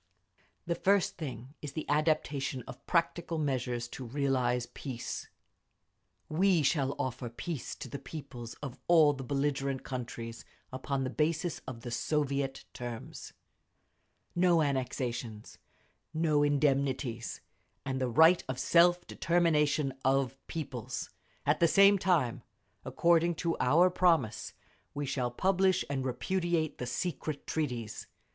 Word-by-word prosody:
"The 170 - 0
first 195 +2 +2
thing 135 -4 -6
is 145 -2 -6
the 155 - -4
adoption 145 -4 0
of - - -10
practical 170 -1 0
measures 125 -5 -1
to 130 - -7
realise 125 -1 0
peace…. 125 -4 -5 1.0
We 175 0 +3
shall 140 -1 +1
offer 130 -3 -3
peace 145 +4 -5
to - - -8
the 140 - -6
peoples 125 -4 -8
of 135 -3 -6
all 160 -4 +6
the 135 -1 -6
belligerent 140 0 -1
countries 120 -2 -6 0.3
upon 135 +1 -2
the 130 - -2
basis 160 +3 0
of 120 -3 -6
the 120 - -6
Soviet 140 0 -1
terms—no 160 +7 -4
annexations, 125 -5 -3 0.6
no 155 -2 +3
indemnities, 140 -4 +1 0.5
and 130 -1 -2
the 130 - +1
right 160 +8 +6
of 130 - -2
self 175 +4 +4
determination 150 -5 +2
of 135 0 +2
peoples. 135 -8 -5 0.3
At 145 +2 +2
the 170 - +5
same 200 +3 +6
time, 170 -11 +1 0.4
according 170 0 +3
to 165 +1 -1
our 165 +9 +5
promise, 165 -12 +2 0.4
we 145 0 -2
shall 130 -2 -1
publish 185 +7 +2
and 135 -2 -1
repudiate 165 +5 -1
the 125 - -3
secret 150 +1 -3
treaties…. 125 -9 -3
140 Hz, 125 wpm, -31 LUFS, 130-165 Hz, 1.0 s, all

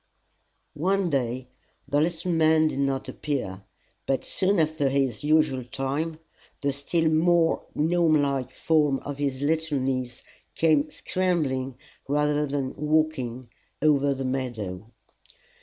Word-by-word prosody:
One 185 +3 0
day 125 -2 -1 0.4
the 145 +1 +2
little 170 +2 -1
man 160 -1 +4
did 140 - -4
not 135 -1 0
appear, 125 -11 -3 0.5
but 135 - 0
soon 195 0 +2
after 155 -3 +1
his 135 -3 0
usual 150 -4 +2
time 135 +5 -3 0.4
the 140 -1 0
still 160 +4 0
more 165 +1 +3
gnome 160 0 +3
like 135 -3 -1
form 150 -1 +2
of 145 0 -6
his 140 -1 -1
little 160 0 +1
niece 130 -2 -2 0.3
came 155 -2 +3
scrambling 145 -10 -1 0.3
rather 150 +1 +1
than 135 -2 -2
walking 150 -6 0 0.3
over 140 -2 +3
the 135 0 -4
meadow. 115 -7 -4
145 Hz, 125 wpm, -26 LUFS, 130-155 Hz, 0.5 s, man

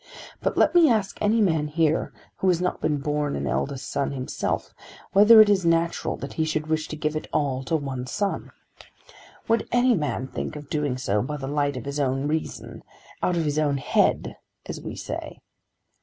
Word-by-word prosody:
But - - -1
let - - +4
me 340 -4 +6
ask 215 -5 0
any 220 +2 +3
man 160 -6 +2
here 155 +1 +1 0.3
who 190 - -1
has 180 -2 +3
not 180 0 -2
been 150 - +1
born 145 +1 -1
an 70 - -3
eldest 70 - -2
son 140 0 -1
himself, 130 -1 -3 0.4
whether 210 +3 +8
it 215 - +6
is 200 -2 +3
natural 165 0 +1
that 140 - -7
he 160 - 0
should 155 -1 -1
wish 155 0 -1
to - - -6
give 155 0 -2
it 155 - -4
all 135 -3 0
to 165 - 0
one 135 -4 -3
son. 200 - -2 1.0
Would 230 0 +1
any 245 +1 +4
man 150 - -1
think 135 - -5
of 145 -1 -10
doing 145 -5 -1
so, 105 -5 0
by 150 +6 -4
the 135 - -6
light 145 -1 -1
of 125 - -7
his 140 +1 -3
own 135 0 0
reason, 155 +1 -4 0.4
out 180 - +1
of 165 - 0
his 150 0 0
own 145 -2 +1
head - - +1 0.3
as - - -6
we - - -6
say? - - -6
150 Hz, 200 wpm, -25 LUFS, 140-170 Hz, 1.0 s, whether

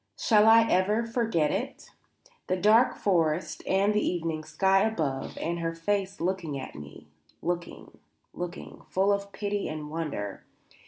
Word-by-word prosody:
Shall 215 -1 +4
I 225 0 +8
ever 210 +2 +2
forget 225 -10 0
it? 250 +8 -4 0.6
The 185 - 0
dark 220 +6 +4
forest 170 -4 0
and 195 +2 +2
the 210 - +1
evening 165 -3 -2
sky 190 +5 +2
above 155 -12 -2
and 170 +1 -2
her 165 0 -2
face 195 +3 -2
looking 170 -4 -2
at 130 - -7
me 75 0 -11 0.4
looking, 175 0 -5 0.3
looking, 175 -1 -7
full 195 +2 +2
of 200 0 -3
pity 205 0 -2
and 150 -1 -6
wonder. 145 -12 -4
185 Hz, 145 wpm, -28 LUFS, 160-205 Hz, 0.6 s, I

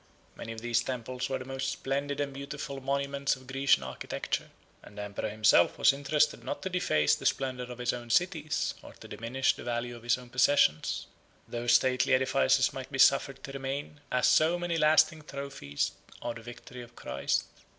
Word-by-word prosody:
Many 115 - -7
of 110 - -9
those 120 -1 +2
temples 125 +1 -4
were 135 - -1
the 130 - -8
most 135 0 -3
splendid 140 +1 -2
and 140 -1 -2
beautiful 140 0 -6
monuments 140 +1 0
of 130 0 -15
Grecian 135 - +2
architecture; 65 0 -4 0.3
and 105 - -15
the 105 - -4
emperor 105 +1 -4
himself 105 -4 +4
was - - +5
interested 145 +2 +1
not - - -5
to 190 - -3
deface 75 - +2
the - - 0
splendor 130 -2 -1
of 125 0 -9
his 125 0 0
own 120 -1 -7
cities, 155 +1 +1
or - - -12
to - - -13
diminish 125 +4 0
the - - -9
value 120 0 -3
of 120 - -11
his 120 +1 +2
own 125 -1 -12
possessions. 125 - +3 0.4
Those 120 0 0
stately 125 +1 +4
edifices 130 0 +3
might 135 0 -7
be 135 - -3
suffered 135 0 +4
to 135 - -7
remain, 135 +2 -5
as 125 - +2
so 160 +3 +4
many 175 -1 -1
lasting 155 +1 +4
trophies 140 - -3 0.3
of 120 -1 -4
the - - -10
victory 120 +1 -10
of 120 0 -13
Christ. - - -1
130 Hz, 190 wpm, -30 LUFS, 120-140 Hz, 0.4 s, was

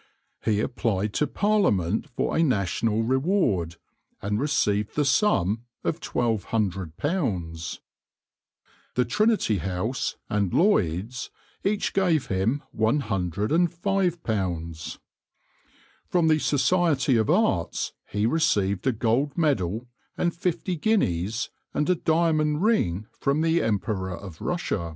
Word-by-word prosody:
He 105 -2 +2
applied 110 -5 -1
to 150 - +1
Parliament 130 - +1
for 120 - -2
a - - +3
national 110 - +1
reward, 130 - +1 0.4
and 105 +1 -1
received 105 -8 0
the 150 - +2
sum 120 - +2 0.2
of 165 - -1
£1200. 95 - -2 1.2
The 125 - +2
Trinity 210 - +2
House 95 - -2
and 100 -3 0
Lloyd's 115 - +1 0.3
each 205 +1 0
gave 175 -7 +2
him 100 +9 0
£105. 110 - 0 1.1
From 175 -3 +2
the 155 0 +4
Society 145 -3 +2
of 110 -2 +1
Arts - - +1
he 105 +1 -1
received 100 - +1
a - - +5
gold 120 +6 0
medal 115 - +1 0.3
and 175 -1 +1
fifty 175 +1 -2
guineas, 110 - 0 0.2
and 150 - +1
a 180 - +4
diamond 160 -1 +1
ring 105 - +1
from 140 +3 +1
the 165 +1 +2
Emperor 100 -4 -1
of 95 -6 -10
Russia. 105 - -2
120 Hz, 110 wpm, -25 LUFS, 100-160 Hz, 1.2 s, a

